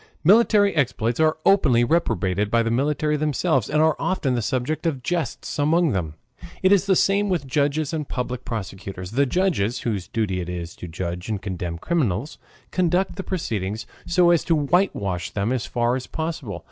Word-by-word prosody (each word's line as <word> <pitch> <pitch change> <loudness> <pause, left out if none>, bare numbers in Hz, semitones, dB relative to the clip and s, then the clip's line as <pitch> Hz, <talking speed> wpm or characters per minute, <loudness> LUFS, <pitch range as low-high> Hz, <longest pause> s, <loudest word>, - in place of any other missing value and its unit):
Military 205 +1 +5
exploits 120 -5 0
are 155 0 +3
openly 140 -12 +4
reprobated 105 - +1
by 115 +1 +3
the 115 - -1
military 150 +4 +1
themselves, 145 -5 0
and 155 +1 +3
are 160 -1 +3
often 155 -9 0
the 120 - 0
subject 130 +9 -1
of 135 -6 -2
jests 170 -1 -3
among 160 +2 +3
them. 80 -7 -2 0.5
It 185 - +5
is 200 0 +4
the 190 - +4
same 200 +3 +2
with 175 -6 0
judges 145 +2 0
and 150 -3 -3
public 125 0 -3
prosecutors. 95 -3 -6
The 140 +4 +2
judges, 145 - 0
whose 100 -6 -2
duty 100 -5 -1
it 85 - -6
is 85 -2 -5
to 90 - -7
judge 90 +3 -5
and 105 -2 -1
condemn 90 -3 -4
criminals, 130 - -1 0.3
conduct 180 +1 +1
the 195 - -4
proceedings 110 - -3 0.2
so 175 0 +4
as 170 - +3
to 165 - +3
whitewash 135 - 0
them 105 +4 -1
as 125 -3 -2
far 120 0 0
as 130 - -5
possible. 155 - -4
130 Hz, 180 wpm, -23 LUFS, 105-165 Hz, 0.5 s, Military